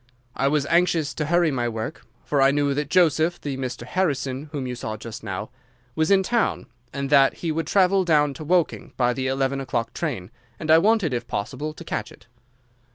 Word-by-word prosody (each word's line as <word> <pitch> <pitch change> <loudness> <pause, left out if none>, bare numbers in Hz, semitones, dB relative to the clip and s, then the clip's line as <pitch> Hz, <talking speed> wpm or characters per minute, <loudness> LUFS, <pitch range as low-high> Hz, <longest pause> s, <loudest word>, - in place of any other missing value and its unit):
I 135 - +1
was 145 0 +1
anxious 165 -3 +2
to 150 +2 -3
hurry 170 -1 +3
my 120 -3 -1
work, 115 +6 -6 0.2
for 145 -2 +1
I 135 - +6
knew 140 0 +1
that 145 0 -2
Joseph—the 160 -4 +2
Mr. 130 -3 -4
Harrison 140 -3 -1
whom 145 -4 -4
you 125 - -3
saw 110 -3 -5
just 115 +1 -8
now—was 125 +7 -5
in 195 -1 +5
town, 235 +2 0 0.3
and 140 0 -4
that 140 -2 +5
he 165 - +1
would 160 0 -2
travel 190 0 +3
down 150 -4 +3
to 145 - -8
Woking 175 +1 0
by 125 -1 +2
the 130 +1 -2
eleven 135 +1 0
o'clock 120 -3 -2
train, 120 - -4 0.3
and 155 - 0
I 160 - +8
wanted 200 - +2
if 120 -1 -3
possible 130 +9 -3
to 170 - -10
catch 120 -9 -4
it. - - -17
140 Hz, 195 wpm, -24 LUFS, 125-160 Hz, 0.3 s, I